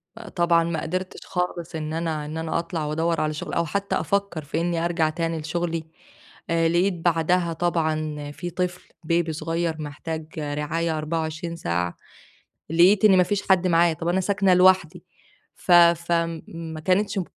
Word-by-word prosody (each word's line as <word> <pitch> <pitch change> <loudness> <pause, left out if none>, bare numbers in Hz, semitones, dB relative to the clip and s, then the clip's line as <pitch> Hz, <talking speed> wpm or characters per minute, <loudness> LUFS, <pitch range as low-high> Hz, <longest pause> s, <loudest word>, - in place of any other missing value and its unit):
فطبعًا 175 -6 +1
ما 165 -2 -2
قدِرتش 185 +3 -4
خالص 180 -2 -3
إن 155 0 -4
أنا 160 -2 -2
إن 155 +2 -6
أنا 160 0 -1
أطلَع 165 -3 -3
وأدوّر 165 +2 0
على 155 0 0
شغل 150 - -6
أو 170 - +1
حتّى 200 +5 -2
أفكّر 200 -6 -1
في 155 +3 -2
إني 170 -1 0
أرجَع 165 -2 +1
تاني 165 0 -2
لشغلي، 165 +1 -2 0.7
آآ، 165 -1 +2
لقيت 180 +3 +2
بعدها 170 0 +1
طبعًا 155 -3 -1
في 175 +4 -6
طفل 180 0 -4 0.2
Baby 170 -1 +1
صغيّر 165 +1 -2
محتاج 155 +2 -6
رعاية 150 +2 -2
24 160 +2 -3
ساعة، 85 - -2 0.7
لقيت 185 +6 +5
إن 190 -3 +7
ما 180 - +6
فيش 205 +2 -1
حد 185 -1 +4
معايا، 170 -1 +4
طب 165 +1 -5
أنا 185 +2 +2
ساكنة 195 -1 +2
لوحدي، 180 -2 +4 0.5
ف 180 - -4
ف 170 0 +6
م 165 -1 0
ما 165 -1 -7
كانتش 195 +3 +1
م - - -1
165 Hz, 165 wpm, -24 LUFS, 160-175 Hz, 0.7 s, إن